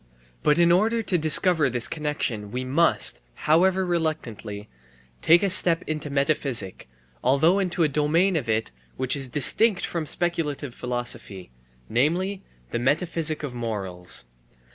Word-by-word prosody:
But 150 Hz, -, +2 dB
in 170 Hz, 0 st, +4 dB
order 225 Hz, +6 st, +2 dB
to 190 Hz, -, -1 dB
discover 155 Hz, -1 st, +3 dB
this 120 Hz, -1 st, +2 dB
connexion 145 Hz, -9 st, -3 dB
we 125 Hz, +4 st, -4 dB
must, 130 Hz, -, +1 dB
however 185 Hz, +4 st, +2 dB
reluctantly, 125 Hz, -, -4 dB, 0.5 s
take 170 Hz, +4 st, +5 dB
a 200 Hz, -, +2 dB
step 170 Hz, -2 st, +3 dB
into 155 Hz, -1 st, -4 dB
metaphysic, 140 Hz, -, -1 dB, 0.3 s
although 150 Hz, +9 st, +3 dB
into 180 Hz, -3 st, 0 dB
a -, -, +3 dB
domain 155 Hz, +6 st, +1 dB
of 125 Hz, -8 st, -2 dB
it 110 Hz, -5 st, -1 dB, 0.3 s
which 130 Hz, +1 st, 0 dB
is 135 Hz, -2 st, -2 dB
distinct 180 Hz, -, +3 dB
from 165 Hz, -3 st, -4 dB
speculative 150 Hz, -7 st, -1 dB
philosophy, 120 Hz, -, -4 dB, 0.4 s
namely, 175 Hz, -, 0 dB, 0.3 s
the -, -, -2 dB
metaphysic 155 Hz, +4 st, 0 dB
of 140 Hz, -4 st, -5 dB
morals. 100 Hz, -, -4 dB
150 Hz, 135 wpm, -24 LUFS, 120-170 Hz, 0.5 s, take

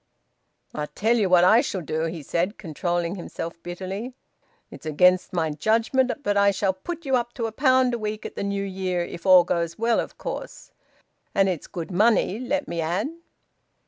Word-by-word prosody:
"I 150 Hz, 0 st, -3 dB
tell 225 Hz, +8 st, +1 dB
you 210 Hz, -5 st, +2 dB
what 180 Hz, -1 st, +6 dB
I 220 Hz, +6 st, +6 dB
shall 195 Hz, -9 st, -3 dB
do," 160 Hz, 0 st, -2 dB
he 165 Hz, -2 st, -5 dB
said, 175 Hz, -, -1 dB
controlling 175 Hz, 0 st, -2 dB
himself 170 Hz, -1 st, -7 dB
bitterly. 190 Hz, +8 st, -6 dB, 0.6 s
"It's -, -, -10 dB
against 180 Hz, +4 st, +3 dB
my 165 Hz, -3 st, 0 dB
judgement, 230 Hz, -, +1 dB
but 205 Hz, -, +1 dB
I 200 Hz, 0 st, +5 dB
shall 195 Hz, 0 st, +1 dB
put 335 Hz, -, -7 dB
you 265 Hz, -1 st, +2 dB
up 240 Hz, -1 st, -1 dB
to 230 Hz, -, -2 dB
a 225 Hz, -, -3 dB
pound 260 Hz, +1 st, +3 dB
a 240 Hz, -, -2 dB
week 215 Hz, 0 st, -4 dB
at -, -, -7 dB
the -, -, -3 dB
New 200 Hz, 0 st, -1 dB
Year, 185 Hz, -2 st, -2 dB
if 170 Hz, +2 st, -7 dB
all 185 Hz, -1 st, +8 dB
goes 170 Hz, -1 st, -2 dB
well, 230 Hz, +1 st, +2 dB
of -, -, -5 dB
course. -, -, -7 dB, 0.6 s
And 195 Hz, -1 st, +4 dB
it's 180 Hz, -5 st, -3 dB
good 170 Hz, -2 st, -6 dB
money, 215 Hz, +1 st, +3 dB
let 280 Hz, +3 st, -2 dB
me 170 Hz, -1 st, -2 dB
add." 175 Hz, -, -1 dB
190 Hz, 190 wpm, -24 LUFS, 175-225 Hz, 0.6 s, all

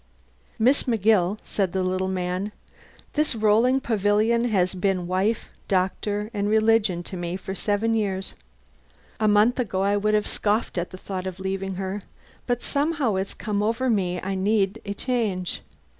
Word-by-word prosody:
"Miss 255 Hz, +6 st, +3 dB
McGill," 215 Hz, -5 st, +3 dB
said 195 Hz, -4 st, -1 dB
the 190 Hz, -1 st, 0 dB
little 185 Hz, +1 st, 0 dB
man, 185 Hz, +2 st, -2 dB, 0.6 s
"this 300 Hz, -4 st, +1 dB
rolling 225 Hz, +4 st, +4 dB
pavilion 220 Hz, +1 st, +2 dB
has 190 Hz, -6 st, +1 dB
been 185 Hz, -1 st, 0 dB
wife, 190 Hz, +5 st, 0 dB, 0.2 s
doctor, 205 Hz, +3 st, 0 dB
and 205 Hz, -1 st, 0 dB
religion 215 Hz, -4 st, +3 dB
to 185 Hz, -, -7 dB
me 175 Hz, 0 st, -3 dB
for 190 Hz, 0 st, -6 dB
seven 205 Hz, +3 st, 0 dB
years. 195 Hz, -4 st, -1 dB, 0.9 s
A 215 Hz, -, +2 dB
month 210 Hz, +5 st, +4 dB
ago 190 Hz, -6 st, 0 dB
I 200 Hz, +1 st, +2 dB
would 215 Hz, +1 st, +2 dB
have 210 Hz, -, +2 dB
scoffed 210 Hz, -3 st, 0 dB
at 175 Hz, -, -3 dB
the 185 Hz, -, -9 dB
thought 185 Hz, -1 st, -5 dB
of 185 Hz, 0 st, -6 dB
leaving 190 Hz, 0 st, -3 dB
her; 190 Hz, +2 st, -3 dB, 0.5 s
but 245 Hz, -1 st, 0 dB
somehow 285 Hz, -5 st, 0 dB
it's 190 Hz, +1 st, -2 dB
come 205 Hz, -2 st, -2 dB
over 230 Hz, +4 st, +1 dB
me 180 Hz, -4 st, 0 dB
I 195 Hz, +2 st, -3 dB
need 200 Hz, +2 st, +1 dB
a 200 Hz, -, -3 dB
change. 210 Hz, -8 st, -1 dB
205 Hz, 160 wpm, -25 LUFS, 190-225 Hz, 0.9 s, rolling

